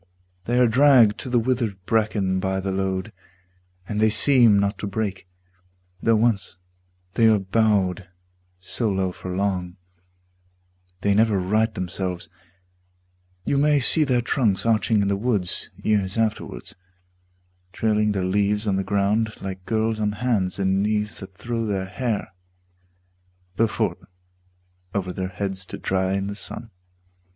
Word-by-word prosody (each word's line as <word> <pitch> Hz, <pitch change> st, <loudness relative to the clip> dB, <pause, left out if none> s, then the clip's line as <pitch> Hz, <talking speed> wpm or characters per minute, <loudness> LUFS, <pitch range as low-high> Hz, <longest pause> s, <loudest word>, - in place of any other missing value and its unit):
They 120 Hz, +1 st, 0 dB
are 125 Hz, -, +6 dB
dragged 120 Hz, -3 st, +5 dB
to 130 Hz, -, -5 dB
the 125 Hz, -, +2 dB
withered 115 Hz, -4 st, 0 dB
bracken 105 Hz, -3 st, +1 dB
by 95 Hz, 0 st, -1 dB
the 95 Hz, 0 st, -2 dB
load, 95 Hz, -1 st, -2 dB, 0.7 s
And 105 Hz, -, -3 dB
they 110 Hz, -, +5 dB
seem 115 Hz, -1 st, +5 dB
not 100 Hz, 0 st, 0 dB
to 105 Hz, -, -3 dB
break; 100 Hz, -3 st, -3 dB, 0.7 s
though 115 Hz, 0 st, +3 dB
once 105 Hz, -5 st, +1 dB, 0.6 s
they 115 Hz, -2 st, +4 dB
are 110 Hz, -1 st, +5 dB
bowed 95 Hz, -2 st, +1 dB, 0.5 s
So 105 Hz, +5 st, -2 dB
low 95 Hz, -2 st, 0 dB
for 90 Hz, -, -9 dB
long, 95 Hz, -2 st, -2 dB, 1.2 s
they 100 Hz, 0 st, +2 dB
never 110 Hz, 0 st, +3 dB
right 110 Hz, +5 st, +1 dB
themselves: 90 Hz, -2 st, -4 dB, 1.2 s
You 140 Hz, -, +1 dB
may 150 Hz, 0 st, +4 dB
see 155 Hz, +4 st, +4 dB
their 125 Hz, -4 st, +1 dB
trunks 115 Hz, -7 st, +1 dB
arching 110 Hz, -1 st, +2 dB
in -, -, 0 dB
the 100 Hz, -, +1 dB
woods 100 Hz, -4 st, -1 dB
Years 100 Hz, -2 st, 0 dB
afterwards, 110 Hz, -, -2 dB, 1.0 s
trailing 105 Hz, +2 st, +1 dB
their 95 Hz, -2 st, -1 dB
leaves 105 Hz, +3 st, +1 dB
on 100 Hz, -2 st, +1 dB
the 95 Hz, -, 0 dB
ground 100 Hz, +3 st, 0 dB
Like 95 Hz, -1 st, -7 dB
girls 110 Hz, 0 st, 0 dB
on 105 Hz, -1 st, 0 dB
hands 105 Hz, -5 st, 0 dB
and 95 Hz, 0 st, +1 dB
knees 105 Hz, 0 st, -1 dB
that 95 Hz, -2 st, -11 dB
throw 115 Hz, +1 st, -3 dB
their 95 Hz, -2 st, -1 dB
hair 105 Hz, 0 st, -3 dB, 1.2 s
Before 110 Hz, +2 st, +1 dB
them -, -, -23 dB, 0.9 s
over 95 Hz, -2 st, -2 dB
their 95 Hz, 0 st, -3 dB
heads 95 Hz, 0 st, -4 dB
to -, -, -7 dB
dry 95 Hz, 0 st, 0 dB
in 95 Hz, 0 st, -1 dB
the 100 Hz, -, -4 dB
sun. 115 Hz, +2 st, -7 dB
105 Hz, 145 wpm, -23 LUFS, 95-110 Hz, 1.2 s, are